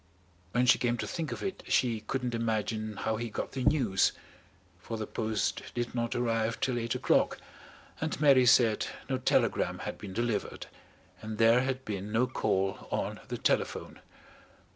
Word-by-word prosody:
When 125 +1 +2
she 125 - +5
came 120 -1 +1
to - - -3
think 165 -3 -4
of - - -5
it, 190 - -3
she 120 -3 +2
couldn't 125 +2 -3
imagine 110 -1 -1
how 110 0 -1
he 120 +1 -3
got - - -4
the 130 - -3
news, 120 -10 +3 0.7
for 115 - -5
the 110 - -3
post 110 0 -1
did 120 -1 -2
not 115 -1 -1
arrive 115 -1 0
till 125 -2 0
eight 115 -1 -2
o'clock, - - +2 0.6
and 155 -2 -2
Mary 135 -4 +6
said 115 -2 +5 0.2
no 130 -1 -1
telegram 130 - +1
had - - -5
been 95 -2 -7
delivered 115 0 -2 0.6
and 110 0 -5
there 115 +2 +5
had 130 0 -2
been 100 0 -4
no 115 +3 +3
call 95 -6 -1
on - - -2
the - - -4
telephone. - - -1
115 Hz, 165 wpm, -30 LUFS, 110-125 Hz, 0.7 s, Mary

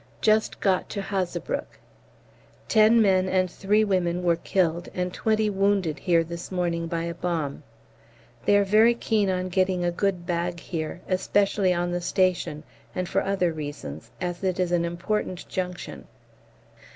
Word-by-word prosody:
Just 215 0 +2
got 190 -2 +1
to - - -4
Hazebrouck. 195 -2 -3 0.9
Ten 220 +1 +5
men 185 -2 +3
and 185 -1 +1
three 210 +3 +2
women 180 -3 0
were 170 -1 +3
killed 170 0 0
and 180 0 -2
twenty 220 -1 +1
wounded 195 -5 +1
here 170 -3 +3
this 170 +2 -7
morning 170 -2 -1
by 165 0 -2
a 170 0 -3
bomb. 165 -5 -3 0.8
They 205 - +5
are 205 - +4
very 215 +4 +5
keen 215 -4 +1
on 185 0 -1
getting 185 -1 +1
a 175 - +1
good 185 -1 -1
bag 175 0 -2
here, 165 0 -5
especially 195 +1 +2
on 175 0 0
the 175 0 -2
station, 175 -4 0 0.3
and 185 -1 -2
for 195 - +1
other 190 -4 0
reasons, 145 - -7
as 175 +1 -4
it 185 -1 0
is 180 -1 +1
an 170 -1 +2
important 180 +2 -3
junction. 180 -1 -5
180 Hz, 155 wpm, -25 LUFS, 170-195 Hz, 0.9 s, Ten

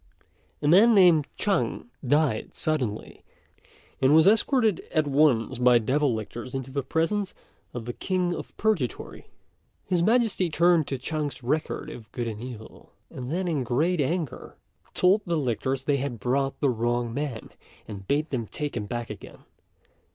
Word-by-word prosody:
A - - +1
man 210 +8 +6
named 175 -7 +5
Chang 205 +3 -1
died 140 -3 +1
suddenly, 130 -9 -3 0.8
and 135 +3 +5
was 160 0 +6
escorted 220 - +3
at 155 -1 +2
once 135 -4 +2
by 125 -1 +6
devil 135 +5 +1
lictors 115 +4 -6
into 135 0 -5
the 140 +1 -1
presence 185 +8 -1 0.4
of 120 -2 -6
the 120 - -4
King 180 +2 -1
of - - -8
Purgatory. 205 - -2 0.6
His 180 -2 +1
Majesty 220 -3 +2
turned 170 -1 +3
to 135 - -2
Chang's 145 0 -4
record 155 +3 -2
of 115 -5 -11
good 120 -2 -3
and 110 -1 -5
evil, 120 -3 -10 0.2
and 125 -1 -7
then, 180 +4 -1
in 155 -6 0
great 150 +8 +1
anger, 155 +1 -3 0.4
told 190 +4 +4
the 170 -1 0
lictors 130 0 -1
they 145 0 +1
had 130 -4 -4
brought 135 +4 -1
the 140 - +3
wrong 120 0 -1
man, 140 -4 -4 0.4
and 100 -3 -9
bade 150 +3 0
them 120 -5 -2
take 150 +5 -5
him 105 -3 -3
back 120 0 -4
again. 105 - -11
140 Hz, 160 wpm, -26 LUFS, 120-170 Hz, 0.8 s, man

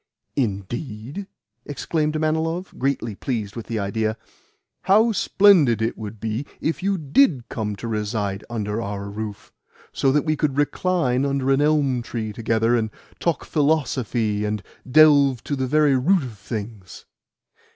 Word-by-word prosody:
"Indeed?" 120 - -3 0.4
exclaimed 150 +2 -2
Manilov, 160 +3 -1
greatly 130 -4 -1
pleased 105 -2 -4
with 115 - -7
the 115 - -2
idea. 110 +2 -1 0.7
"How 220 +4 +5
splendid 185 - +4
it 115 +1 -1
would 110 0 -8
be 115 +6 -3
if 160 - -2
you 195 +1 +1
DID 145 - +2
come 105 -4 -3
to 115 - -7
reside 105 -2 -2
under 110 -1 -2
our 100 -1 -5
roof, 105 -1 -7 0.4
so 135 - +2
that 150 +2 +1
we 155 -1 +1
could 145 -3 -1
recline 145 -3 +1
under 135 -1 0
an 135 +1 +3
elm 145 -4 +2
tree 110 -2 -4
together, 115 +1 +1
and 110 -2 0 0.3
talk 170 -3 -1
philosophy, 130 -8 0
and 105 -1 -2 0.3
delve 140 -3 +5
to 145 - -2
the 130 -1 -1
very 150 0 +3
root 165 +7 +3
of 120 -4 -7
things!" 105 -4 -7
125 Hz, 145 wpm, -23 LUFS, 110-150 Hz, 0.7 s, How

